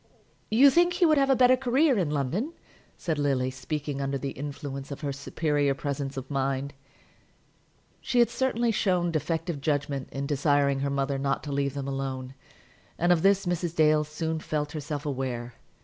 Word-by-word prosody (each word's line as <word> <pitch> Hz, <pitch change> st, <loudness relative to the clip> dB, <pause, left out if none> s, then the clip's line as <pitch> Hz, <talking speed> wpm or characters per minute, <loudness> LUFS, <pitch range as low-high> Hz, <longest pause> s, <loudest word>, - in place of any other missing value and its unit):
"You 265 Hz, +6 st, +6 dB
think 350 Hz, +4 st, +4 dB
he 355 Hz, 0 st, +3 dB
would 310 Hz, -3 st, +4 dB
have 275 Hz, 0 st, +2 dB
a 270 Hz, -, +5 dB
better 255 Hz, 0 st, +6 dB
career 265 Hz, +3 st, +2 dB
in 180 Hz, -8 st, 0 dB
London?" 150 Hz, -, -1 dB, 0.4 s
said 160 Hz, -4 st, -2 dB
Lily, 135 Hz, -3 st, +1 dB
speaking 145 Hz, +1 st, -4 dB
under 135 Hz, 0 st, -1 dB
the 135 Hz, +1 st, -4 dB
influence 140 Hz, -1 st, -6 dB
of 140 Hz, -, -7 dB
her 140 Hz, -2 st, -2 dB
superior 145 Hz, 0 st, 0 dB
presence 140 Hz, -1 st, -4 dB
of 135 Hz, +2 st, -6 dB
mind. 135 Hz, 0 st, -1 dB, 1.3 s
She 255 Hz, -, -2 dB
had 235 Hz, -1 st, +5 dB
certainly 240 Hz, -1 st, +1 dB
shown 180 Hz, -5 st, +1 dB
defective 160 Hz, 0 st, -2 dB
judgment 140 Hz, -2 st, -1 dB
in 135 Hz, +1 st, -3 dB
desiring 145 Hz, -1 st, +2 dB
her 140 Hz, +1 st, -1 dB
mother 140 Hz, 0 st, -1 dB
not 135 Hz, 0 st, -1 dB
to 145 Hz, -, -5 dB
leave 140 Hz, -1 st, -1 dB
them 140 Hz, -1 st, -4 dB
alone; 135 Hz, -1 st, -4 dB, 0.6 s
and 175 Hz, +1 st, +2 dB
of 170 Hz, -2 st, +4 dB
this 195 Hz, +1 st, +3 dB
Mrs. 175 Hz, -1 st, -2 dB
Dale 155 Hz, -1 st, +4 dB
soon 160 Hz, +1 st, -3 dB
felt 150 Hz, -1 st, -3 dB
herself 150 Hz, -1 st, -5 dB
aware. 125 Hz, -4 st, -3 dB
145 Hz, 175 wpm, -27 LUFS, 140-175 Hz, 1.3 s, You